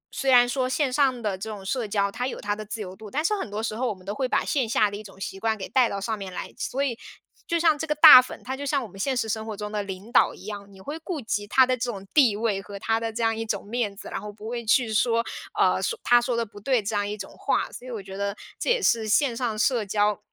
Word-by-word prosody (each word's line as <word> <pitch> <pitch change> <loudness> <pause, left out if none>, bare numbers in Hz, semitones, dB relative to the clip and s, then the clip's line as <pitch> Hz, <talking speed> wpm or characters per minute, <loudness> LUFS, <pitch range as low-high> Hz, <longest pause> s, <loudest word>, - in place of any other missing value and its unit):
虽 270 - 0
然 245 -1 +7
说 255 +1 0
线 270 0 0
上 260 -3 +2
的 205 -3 0
这 210 +4 -6
种 205 -3 -7
社 235 +2 -1
交 200 -1 0
它 250 +4 -3
有 - - -5
它 205 0 -2
的 215 - -6
自 215 +1 -6
由 185 -2 -7
度， 215 +1 -11
但 295 +8 -1
是 420 - +2
很 385 - -4
多 210 +2 -4
时 220 -1 -2
候， 250 +3 -1
我 - - -1
们 185 -1 -18
都 200 - -3
会 255 +4 -1
把 - - +1
线 265 -5 0
下 210 -1 +3
的 - - -5
一 - - -8
种 195 -2 -14
习 195 0 -5
惯 220 +1 0
给 190 - -6
带 250 -3 +3
到 200 - -3
上 220 +2 -2
面 195 -1 -6
来。 180 - -6
所 275 +2 -2
以 245 -4 -2 0.5
就 335 - +1
像 325 -2 +4
这 320 - -3
个 300 - 0
大 285 -3 +11
粉， 255 - -9
他 260 - -3
就 280 - -7
像 280 -1 0
我 - - -7
们 195 0 -14
现 265 +5 0
实 230 - 0
生 220 0 -2
活 215 -2 -6
中 210 0 -5
的 210 -1 -1
领 195 +2 -8
导 - - +4
一 - - -14
样， 205 -1 -7
你 195 - -15
会 290 +11 -6
顾 325 0 -4
及 210 -4 -3
他 260 +5 +5
的 255 0 +1
这 250 0 -3
种 195 -3 -8
地 255 -9 +5
位， 210 -2 -1
和 200 0 -9
他 225 +3 0
的 225 0 -3
这 230 +1 -3
样 225 0 +2
一 225 - -3
种 210 -3 -3
面 215 -2 -2
子， - - -9
然 - - -4
后 210 - -7
不 210 +1 -10
会 235 0 -4
去 230 0 +2
说， 230 +1 +2 0.3
呃 - - +4 0.3
“他 240 0 +6
说 240 0 -1
的 235 - 0
不 205 -1 -13
对” 245 +1 +1
这 215 +1 -2
样 205 0 0
一 210 - -4
种 195 -1 -9
话， - - -1
所 250 - -10
以 - - -7
我 220 -4 -5
觉 190 0 -9
得 200 +1 -2 0.2
这 - - -2
也 485 +1 +3
是 225 -8 +2
线 240 +3 +2
上 230 -3 -2
社 235 +1 +2
交 205 0 +1
225 Hz, 330 characters per minute, -25 LUFS, 205-255 Hz, 0.5 s, 大